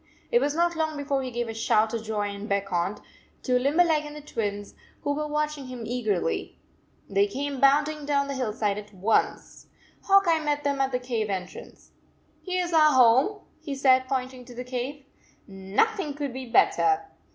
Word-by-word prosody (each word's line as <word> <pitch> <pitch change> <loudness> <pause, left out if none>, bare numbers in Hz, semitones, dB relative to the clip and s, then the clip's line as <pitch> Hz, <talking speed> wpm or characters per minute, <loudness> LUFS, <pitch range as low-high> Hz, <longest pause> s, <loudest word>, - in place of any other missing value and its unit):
It 480 - +4
was 290 +1 0
not 340 +1 +2
long 315 -1 -1
before 280 -1 -1
he 260 - -4
gave 240 -1 -3
a 225 - -5
shout 220 0 +1
of 230 -1 -3
joy 210 -2 -2
and 200 +1 -7
beckoned 195 0 -1 0.4
to 250 -1 +2
Limberleg 305 +3 +3
and 295 0 -9
the 300 - -8
Twins, 205 -7 -4 0.3
who 285 - 0
were 300 +1 -2
watching 300 -2 -2
him 250 -2 -7
eagerly. 215 -9 -2 0.5
They 400 +1 +2
came 285 -7 -4
bounding 290 +2 +3
down 280 -1 +1
the 280 - -3
hillside 215 -5 -1
at 210 -1 -13
once. 200 +4 -1 0.4
Hawk 395 0 +6
Eye 330 -2 +3
met 290 -1 -1
them 280 -1 0
at 270 0 +1
the 250 - +1
cave 240 -4 -3
entrance. 185 -2 -7 0.5
Here 365 -1 -1
s 345 - -6
our 305 -2 +6
home, 260 - +4 0.2
he 305 -3 -5
said, 260 -1 +4
point 260 -1 -2
ing 250 -1 -11
to 245 -1 -12
the 250 - -5
cave. 255 +3 -5 0.3
" - - -36 0.3
Nothing 390 -10 +2
could 285 -3 -4
be 260 0 -6
better. 400 - +3
270 Hz, 190 wpm, -26 LUFS, 230-300 Hz, 0.5 s, Hawk